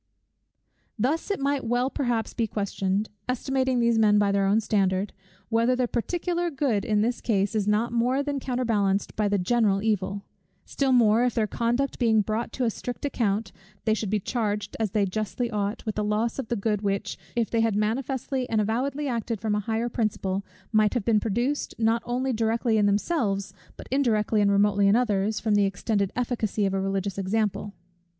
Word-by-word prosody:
Thus 275 Hz, -, 0 dB
it 405 Hz, -, -1 dB
might 280 Hz, 0 st, 0 dB
well 245 Hz, +3 st, 0 dB
perhaps 240 Hz, -5 st, -1 dB
be 230 Hz, -2 st, 0 dB
questioned, 200 Hz, 0 st, -1 dB, 0.2 s
estimating 260 Hz, 0 st, 0 dB
these 235 Hz, -1 st, +3 dB
men 210 Hz, -1 st, +5 dB
by 205 Hz, -1 st, +3 dB
their 200 Hz, 0 st, +2 dB
own 205 Hz, +3 st, +4 dB
standard, 195 Hz, -2 st, 0 dB, 0.4 s
whether 230 Hz, +2 st, +2 dB
the 250 Hz, -1 st, +1 dB
particular 345 Hz, +8 st, -1 dB
good 265 Hz, -9 st, 0 dB
in 210 Hz, -1 st, +1 dB
this 235 Hz, +2 st, 0 dB
case, 200 Hz, -2 st, +1 dB
is 210 Hz, -2 st, 0 dB
not 215 Hz, +3 st, +1 dB
more 250 Hz, +4 st, +1 dB
than 285 Hz, -1 st, -2 dB
counterbalanced 225 Hz, -7 st, 0 dB
by 210 Hz, -1 st, +1 dB
the 205 Hz, 0 st, +1 dB
general 200 Hz, 0 st, +2 dB
evil; 200 Hz, -2 st, -1 dB, 0.4 s
still 275 Hz, -1 st, 0 dB
more, 230 Hz, -2 st, +5 dB
if 250 Hz, -2 st, 0 dB
their 220 Hz, -, +2 dB
conduct 240 Hz, +5 st, -1 dB
being 225 Hz, -3 st, +4 dB
brought 215 Hz, +3 st, -2 dB
to 260 Hz, -, -2 dB
a 230 Hz, -, +2 dB
strict 245 Hz, +5 st, -6 dB
account, 215 Hz, -6 st, -1 dB, 0.3 s
they 220 Hz, -, +3 dB
should 215 Hz, -2 st, -2 dB
be 210 Hz, +1 st, +1 dB
charged, 210 Hz, -2 st, -2 dB
as 220 Hz, -2 st, 0 dB
they 205 Hz, +1 st, +1 dB
justly 215 Hz, +5 st, -2 dB
ought, 205 Hz, +1 st, -2 dB
with 215 Hz, -, -1 dB
the 210 Hz, -, -2 dB
loss 215 Hz, +4 st, 0 dB
of 260 Hz, -, -3 dB
the 235 Hz, -, -1 dB
good 210 Hz, -1 st, -1 dB
which, 200 Hz, -1 st, -2 dB, 0.2 s
if 235 Hz, -2 st, 0 dB
they 230 Hz, -, +2 dB
had 225 Hz, -2 st, +1 dB
manifestly 255 Hz, +4 st, -1 dB
and 220 Hz, -, +1 dB
avowedly 260 Hz, +7 st, -1 dB
acted 230 Hz, -3 st, -2 dB
from 215 Hz, 0 st, -1 dB
a 210 Hz, -, +1 dB
higher 225 Hz, +3 st, -1 dB
principle, 200 Hz, -5 st, -1 dB, 0.3 s
might 215 Hz, +1 st, +3 dB
have 230 Hz, -5 st, -1 dB
been 225 Hz, -2 st, +4 dB
produced, 240 Hz, +7 st, -1 dB
not 230 Hz, +1 st, +2 dB
only 255 Hz, +2 st, 0 dB
directly 225 Hz, 0 st, +1 dB
in 205 Hz, -, +3 dB
themselves, 200 Hz, -, 0 dB, 0.2 s
but -, -, -10 dB
indirectly 220 Hz, -5 st, +2 dB
and 200 Hz, -1 st, +3 dB
remotely 200 Hz, 0 st, +3 dB
in 200 Hz, -, +5 dB
others, 215 Hz, -3 st, +1 dB
from 220 Hz, -2 st, 0 dB
the 205 Hz, -1 st, +4 dB
extended 200 Hz, 0 st, -1 dB
efficacy 230 Hz, -4 st, -1 dB
of 195 Hz, -, 0 dB
a 195 Hz, -, 0 dB
religious 195 Hz, 0 st, -2 dB
example. 205 Hz, +1 st, -1 dB
220 Hz, 190 wpm, -26 LUFS, 205-245 Hz, 0.4 s, men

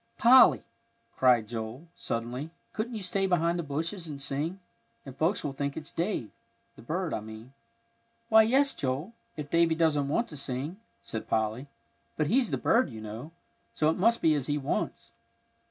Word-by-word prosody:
"Polly," 255 Hz, +2 st, +7 dB, 0.5 s
cried 125 Hz, -4 st, +4 dB
Joel, 115 Hz, +7 st, -6 dB
suddenly, 120 Hz, +6 st, -4 dB, 0.2 s
"couldn't 230 Hz, +2 st, -3 dB
you 210 Hz, -, -5 dB
stay 195 Hz, +1 st, 0 dB
behind 170 Hz, -1 st, +1 dB
the -, -, -2 dB
bushes 165 Hz, +5 st, -3 dB
and 145 Hz, -3 st, -6 dB
sing? 145 Hz, +7 st, -2 dB, 0.5 s
and 135 Hz, -2 st, -9 dB
folks 165 Hz, +8 st, +1 dB
will 145 Hz, -, -3 dB
think 140 Hz, 0 st, -3 dB
it's 160 Hz, 0 st, -6 dB
Dave, 170 Hz, -, -2 dB, 0.4 s
the -, -, -14 dB
bird 165 Hz, +7 st, -2 dB
I -, -, -1 dB
mean." 110 Hz, +4 st, -11 dB, 0.7 s
"Why, 220 Hz, -1 st, +7 dB
yes, 270 Hz, +5 st, +3 dB
Joel, 140 Hz, -, -3 dB, 0.2 s
if 145 Hz, -1 st, -6 dB
Davie 170 Hz, -1 st, +3 dB
doesn't 155 Hz, -4 st, +2 dB
want 230 Hz, +12 st, 0 dB
to 150 Hz, -, -7 dB
sing," 140 Hz, +6 st, -3 dB, 0.3 s
said 110 Hz, -, -6 dB
Polly; 110 Hz, +5 st, -1 dB, 0.5 s
"but 155 Hz, -, +2 dB
he's 245 Hz, -, +2 dB
the -, -, -1 dB
bird, 240 Hz, +3 st, +3 dB
you 110 Hz, -4 st, -8 dB
know, 110 Hz, +7 st, -7 dB, 0.5 s
so 155 Hz, 0 st, +3 dB
it -, -, -2 dB
must 230 Hz, +5 st, +2 dB
be 160 Hz, -, +5 dB
as 145 Hz, -3 st, -1 dB
he 145 Hz, 0 st, 0 dB
wants." 135 Hz, -, -3 dB
150 Hz, 175 wpm, -29 LUFS, 130-180 Hz, 0.7 s, Polly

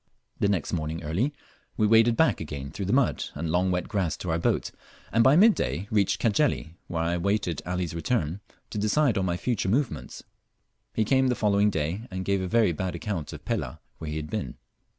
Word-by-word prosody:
The -, -, +3 dB
next 95 Hz, -6 st, -1 dB
morning 80 Hz, 0 st, -2 dB
early 90 Hz, -, 0 dB, 0.5 s
we 110 Hz, -, +3 dB
waded 115 Hz, +2 st, +5 dB
back 160 Hz, -, +3 dB
again 70 Hz, -3 st, -6 dB
through 95 Hz, +4 st, -4 dB
the -, -, 0 dB
mud 130 Hz, +1 st, +2 dB
and 80 Hz, +1 st, -3 dB
long 90 Hz, +2 st, +2 dB
wet 90 Hz, -1 st, -1 dB
grass 95 Hz, -7 st, -1 dB
to 90 Hz, -, -3 dB
our 80 Hz, -, +1 dB
boat, -, -, 0 dB, 0.4 s
and 115 Hz, +2 st, +4 dB
by 130 Hz, +4 st, +6 dB
mid 215 Hz, +6 st, +7 dB
day 95 Hz, -, -2 dB
reached 100 Hz, -3 st, +2 dB
Cajeli, 115 Hz, -, +1 dB
where 80 Hz, -2 st, -2 dB
I 85 Hz, +1 st, 0 dB
waited 95 Hz, -3 st, 0 dB
Ali's 90 Hz, -2 st, -2 dB
return 85 Hz, -, -1 dB, 0.3 s
to 105 Hz, -, -3 dB
decide 120 Hz, +5 st, +2 dB
on 95 Hz, -, +1 dB
my 85 Hz, -1 st, 0 dB
future 110 Hz, -2 st, -1 dB
movements. 100 Hz, -, -1 dB, 0.7 s
He 110 Hz, -, +2 dB
came 130 Hz, +3 st, +3 dB
the 125 Hz, -, +2 dB
following 105 Hz, -1 st, +3 dB
day, 90 Hz, +6 st, -2 dB
and 95 Hz, 0 st, -4 dB
gave 100 Hz, -1 st, +1 dB
a 95 Hz, -, -2 dB
very 110 Hz, -1 st, +3 dB
bad 90 Hz, +2 st, -3 dB
account 85 Hz, -3 st, -4 dB
of -, -, -10 dB
Pelah, -, -, -2 dB, 0.2 s
where 80 Hz, -, -5 dB
he 75 Hz, -, -4 dB
had 75 Hz, 0 st, -5 dB
been. 100 Hz, -, -3 dB
95 Hz, 210 wpm, -27 LUFS, 85-110 Hz, 0.7 s, mid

